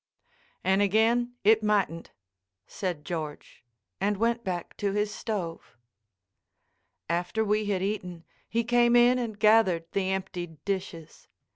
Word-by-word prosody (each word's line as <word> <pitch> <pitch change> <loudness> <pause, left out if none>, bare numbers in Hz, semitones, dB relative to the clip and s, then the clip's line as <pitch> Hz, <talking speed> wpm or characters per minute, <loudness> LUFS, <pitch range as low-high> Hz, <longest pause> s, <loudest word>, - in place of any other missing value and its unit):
"And 190 +2 +3
again 230 +4 +2
it 220 +2 +5
mightn't," 200 -6 0 0.6
said 175 - -4
George, 155 -7 -6 0.4
and 205 0 0
went 235 +2 0
back 180 -4 -4
to 200 -1 -1
his 210 0 -1
stove. 180 - -5 1.3
After 175 +6 -1
we 210 +1 +1
had 190 -2 0
eaten, 180 -4 -4 0.3
he 230 +1 0
came 240 0 +3
in 245 +1 +5
and 225 -4 -4
gathered 210 -6 +4
the 190 -1 -1
emptied 180 -4 -5
dishes. 185 -5 -5
200 Hz, 125 wpm, -27 LUFS, 180-220 Hz, 1.3 s, it